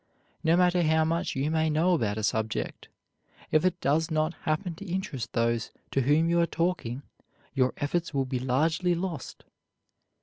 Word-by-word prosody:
No 165 +1 +4
matter 180 0 +4
how 160 -1 +3
much 165 +1 -1
you 140 +3 0
may 160 0 +2
know 165 +4 +3
about 110 -10 0
a 110 - -3
subject, 110 - -2 0.6
if 155 +1 +4
it 185 -1 +1
does 155 +4 +2
not 155 +1 0
happen 170 +3 -2
to 200 - -8
interest 170 - -3
those 115 -1 +1 0.2
to 135 - +2
whom 150 +5 +3
you 170 0 +3
are 170 - +2
talking 160 -8 -2 0.5
your 130 -2 +2
efforts 165 +4 -1
will 135 -2 0
be 130 -1 -2
largely 155 +8 +1
lost. 170 -5 -5
155 Hz, 170 wpm, -28 LUFS, 135-170 Hz, 0.6 s, No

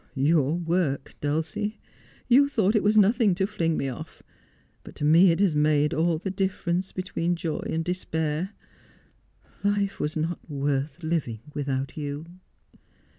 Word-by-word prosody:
' - - -35 0.2
Your 150 -1 +2
work, 165 -5 -1
Dulcie. 160 +8 -2 0.5
You 275 +3 +5
thought 215 -5 +2
it 215 - +4
was 210 +2 +3
nothing 210 -1 +4
to 190 +1 +1
fling 165 -6 -1
me 135 - -1
off; 130 - -8 0.6
but - - -12
to 150 - -2
me 165 +5 +6
it 185 0 +2
made 150 0 +2
all 165 +1 +1
the 190 +4 -4
difference 190 -1 -1
between 175 -2 -2
joy 165 -2 -3
and 165 0 -1
despair. 160 -1 -2 1.1
Life 200 -1 0
was 150 +1 -2
not 160 +2 -2
worth 140 +2 -2
living 155 -9 -2
without 135 -1 -3
you.' 145 +1 -4
165 Hz, 145 wpm, -26 LUFS, 150-190 Hz, 1.1 s, me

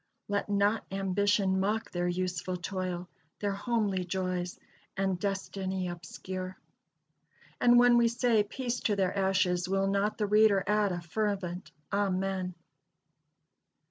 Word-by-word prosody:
"Let 205 0 -1
not 205 +2 +2
ambition 195 0 +1
mock 210 +3 -1
their 175 0 -1
useful 180 0 -2
toil, 180 0 -4 0.3
Their 205 -1 0
homely 200 -2 0
joys 180 -1 -3 0.4
and 190 -2 0
destiny 190 -1 -2
obscure;" 185 +2 -6 1.0
and 240 0 +6
when 245 0 +6
we 235 0 +5
say, 235 -2 +3
Peace 240 +4 -3
to 210 - +1
their 190 -1 0
ashes! 185 -2 +1
will 195 0 +2
not 200 +2 +1
the 210 - +1
reader 210 -1 +4
add 210 -1 +2
a 175 -1 -3
fervent 190 0 -2 0.2
Amen! 190 -2 0
195 Hz, 125 wpm, -30 LUFS, 185-205 Hz, 1.0 s, and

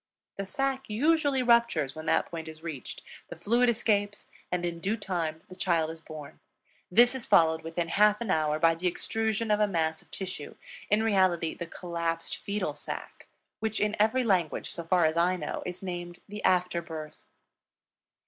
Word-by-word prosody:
The 195 -1 -4
sac 270 +4 -1
usually 285 +3 +2
ruptures 235 - +3
when 155 0 -8
that - - +3
point 165 -1 -7
is 160 0 -10
reached, 155 -7 -6 0.3
the - - -7
fluid 240 +3 +2
escapes, 205 -3 0 0.2
and 180 -1 0
in 170 -1 -3
due 200 +6 -1
time 170 -6 -3
the 185 - -11
child 165 -4 +1
is 165 0 -11
born. 155 -3 -10 0.5
This 240 +6 +6
is 260 -3 -4
followed 160 -1 +5
within 165 +1 -3
half 210 +3 +4
an 230 -5 -2
hour 155 -3 +2
by 165 +1 +4
the 170 +3 -2
extrusion 220 +4 -1
of 210 - +3
a 210 - +4
mass 160 -4 0
of - - -23
tissue 185 -6 -6 0.3
in 210 +2 +3
reality 185 -6 +2
the 170 - -6
collapsed 170 -1 -3
fetal 205 +1 -2
sac - - -7 0.3
which 220 0 -2
in 210 +1 +1
every 225 +5 +3
language, 185 -8 0
so 170 - -4
far 175 0 +3
as 160 +1 +1
I 175 +2 +3
know, 180 - -4
is 180 +2 -6
named 175 -1 -5
the 210 +1 -7
After 180 -1 +2
Birth. 160 -2 -8
180 Hz, 180 wpm, -29 LUFS, 165-210 Hz, 0.5 s, This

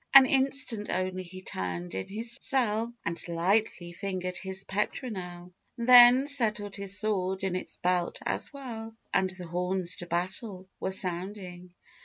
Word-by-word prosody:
An 270 -1 +12
instant 265 -5 +1
only 185 0 -1
he 185 +1 -10
turned 90 - -4
in 95 0 -4
his 225 +3 -2
sell, 230 -3 +1
And 170 0 -3
lightly 175 +1 0
fingered 185 -1 -4
his 190 +1 -3
petronel, 185 -4 -4 0.2
Then 245 +2 +8
settled 220 -8 +2
his 200 0 -2
sword 190 -2 -1
in 190 -2 -1
its 185 - -4
belt 180 -1 0
as - - -2
well, 230 -6 -7 0.2
And 190 - +2
the 185 -1 -4
horns 180 +1 -1
to 175 - -8
battle 185 +3 -3
were - - -2
sounding. 180 -1 -2
190 Hz, 145 wpm, -29 LUFS, 180-225 Hz, 0.2 s, An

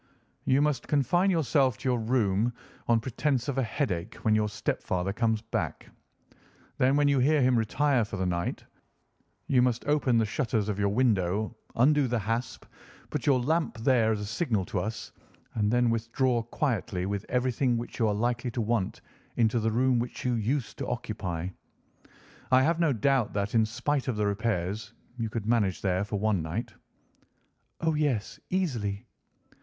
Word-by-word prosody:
"You 135 +2 +3
must 150 -2 0
confine 175 +7 +2
yourself 135 - +2
to - - -5
your 125 -1 +1
room, 110 -1 +1 0.3
on 115 -1 +4
pretence 130 +2 -1
of 140 -2 -1
a - - +3
headache, 110 - -2
when 110 - +4
your 105 0 +2
stepfather 100 -2 -2
comes 110 -1 0
back. 115 - -4 0.9
Then 130 +2 +4
when 145 0 +3
you 140 -1 +3
hear 150 +4 +3
him 125 0 +4
retire 125 +3 +2
for 105 -1 -5
the 95 - -1
night, 85 -1 -2 0.8
you 130 -2 +3
must 125 -1 +1
open 145 -5 +2
the 115 - +3
shutters 110 -2 -1
of 105 -1 -2
your 100 0 +2
window, 105 -2 +1 0.2
undo 140 +3 +4
the 120 0 0
hasp, 115 +4 -3 0.5
put - - -3
your 135 -3 +5
lamp 160 +5 0
there 115 -1 +3
as 110 - 0
a - - -3
signal 110 - -1
to - - -2
us, 110 +1 -5 0.4
and 105 -1 +1
then 120 -1 +3
withdraw 115 +2 +1
quietly 115 -7 -2
with 100 +1 -2
everything 125 0 +1
which 120 +2 -6
you 115 - +3
are 105 - +1
likely 120 +3 -1
to 120 - -4
want 110 -3 -1 0.3
into 115 0 +2
the 110 0 +1
room 125 +2 +2
which 120 +2 -5
you 125 - +2
used 120 +3 -2
to - - -3
occupy. 85 -2 -3 1.0
I 130 0 +6
have 165 +3 +2
no 165 -3 +3
doubt 130 0 +1
that, 100 0 -2
in 110 -2 +3
spite 130 +4 -1
of 125 - 0
the 105 0 0
repairs, 100 0 -2 0.2
you 115 -2 -2
could 110 -1 -4
manage 110 -5 +1
there 95 0 +1
for 105 0 -3
one 105 -3 +1
night." 100 +9 -4 1.1
"Oh, 160 -1 +2
yes, 145 -9 -1
easily." 120 - -1
115 Hz, 175 wpm, -28 LUFS, 105-130 Hz, 1.1 s, I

